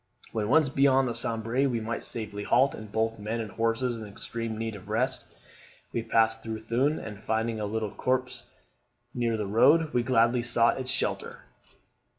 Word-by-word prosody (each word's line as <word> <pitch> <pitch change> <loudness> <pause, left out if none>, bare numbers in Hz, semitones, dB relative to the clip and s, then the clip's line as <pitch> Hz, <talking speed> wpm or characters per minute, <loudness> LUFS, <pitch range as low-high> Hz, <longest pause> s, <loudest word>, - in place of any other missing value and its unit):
When 110 -2 -2
once 155 +2 +5
beyond 135 -1 +3
the 120 - -2
Sambre 115 +3 +1
we 120 -2 -1
might 115 +1 -4
safely 105 -3 -5
halt; 130 +6 +3
and 110 -1 -9
both 115 +1 -1
men 110 +3 -3
and 110 -2 -5
horses 115 +1 0
were 110 - -7
in - - -11
extreme 115 +2 -5
need 115 0 -3
of 100 +1 -12
rest. 115 +4 -1 0.6
We 115 - 0
passed 110 0 +2
through 110 -1 -5
Thuin; 130 +7 +1
and 105 -2 -8
finding 110 +1 -1
a 105 - -2
little 110 -1 -2
copse 130 +2 -2 0.7
near 120 -2 0
the 105 - -2
road, 145 +10 +4
we 125 - +3
gladly 120 0 +3
sought 120 +1 +2
its 130 -1 -4
shelter. - - -2
115 Hz, 180 wpm, -28 LUFS, 110-125 Hz, 0.7 s, once